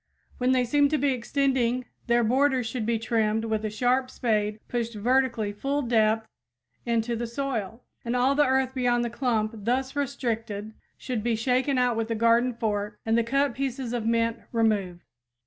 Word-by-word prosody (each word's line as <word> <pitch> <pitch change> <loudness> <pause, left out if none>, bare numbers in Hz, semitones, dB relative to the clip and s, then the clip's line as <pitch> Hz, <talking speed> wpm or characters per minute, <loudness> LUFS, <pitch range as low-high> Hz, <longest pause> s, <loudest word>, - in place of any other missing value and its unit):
When 250 +1 +2
they 255 -1 +3
seem 285 +3 +3
to 305 - +1
be 285 -1 +2
extending, 255 -1 0 0.2
their 235 0 +3
borders 260 +2 +2
should 225 -1 -3
be 230 -1 +2
trimmed 220 -1 0
with 220 -1 -1
a 215 - -1
sharp 250 +4 +1
spade 215 -4 -1
pushed 235 -2 -3
vertically 235 -1 +1
full 275 +7 -1
depth 220 -2 +2 0.6
into 235 0 0
the 235 +1 -3
soil 235 -3 -4 0.2
and 235 +1 -2
all 255 +2 +3
the 295 +1 +4
earth 260 0 +1
beyond 245 -2 +1
the 235 - -3
clump 230 -4 0
thus 250 +6 -2
restricted 225 -6 -3 0.2
should 250 -4 -3
be 235 +1 0
shaken 255 +4 +1
out 250 -2 +2
with 225 0 -2
a 230 - 0
garden 230 +2 +3
fork 210 -2 -2
and 225 0 +2
the 235 - +3
cut 275 +3 +1
pieces 255 -1 -3
of 230 -2 -2
mint 230 0 +1
removed. 205 -6 0
235 Hz, 180 wpm, -26 LUFS, 225-255 Hz, 0.6 s, the